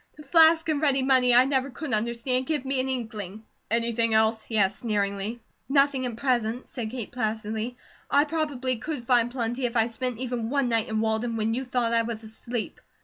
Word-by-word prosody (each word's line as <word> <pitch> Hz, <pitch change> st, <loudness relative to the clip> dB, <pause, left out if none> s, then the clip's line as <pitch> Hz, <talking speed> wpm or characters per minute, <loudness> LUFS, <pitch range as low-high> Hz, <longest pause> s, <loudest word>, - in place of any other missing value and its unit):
The 300 Hz, -, -11 dB
flask 325 Hz, +2 st, +5 dB
and 305 Hz, -2 st, 0 dB
ready 275 Hz, -3 st, +2 dB
money 255 Hz, -2 st, +4 dB
I 250 Hz, +1 st, +7 dB
never 270 Hz, 0 st, 0 dB
could 280 Hz, 0 st, -5 dB
understand 235 Hz, +4 st, -1 dB
give 295 Hz, -4 st, -1 dB
me 270 Hz, 0 st, 0 dB
an 260 Hz, +1 st, -1 dB
inkling." 220 Hz, -5 st, -5 dB, 0.3 s
"Anything 230 Hz, 0 st, +1 dB
else?" 220 Hz, 0 st, +3 dB
he 220 Hz, -, -3 dB
asked, 195 Hz, -1 st, +2 dB
sneeringly. 205 Hz, 0 st, -2 dB, 0.3 s
"Nothing 275 Hz, -2 st, +3 dB
at 235 Hz, -, -5 dB
present," 245 Hz, -2 st, 0 dB
said 235 Hz, -4 st, -5 dB
Kate 235 Hz, -2 st, -6 dB
placidly. 220 Hz, 0 st, -3 dB, 0.3 s
"I 285 Hz, -, +5 dB
probably 290 Hz, -5 st, -2 dB
could 290 Hz, +1 st, -5 dB
find 240 Hz, -1 st, +3 dB
plenty, 240 Hz, 0 st, -2 dB
if 240 Hz, 0 st, -3 dB
I 225 Hz, -, +5 dB
spent 245 Hz, +1 st, -3 dB
even 245 Hz, -2 st, -3 dB
one 275 Hz, -2 st, +1 dB
night 230 Hz, -1 st, 0 dB
in 220 Hz, 0 st, 0 dB
Walden 225 Hz, +1 st, 0 dB
when 220 Hz, 0 st, 0 dB
you 255 Hz, +3 st, -2 dB
thought 245 Hz, -2 st, 0 dB
I 230 Hz, -, +4 dB
was 230 Hz, -1 st, -5 dB
asleep." 220 Hz, +1 st, -6 dB
240 Hz, 200 wpm, -26 LUFS, 225-265 Hz, 0.3 s, I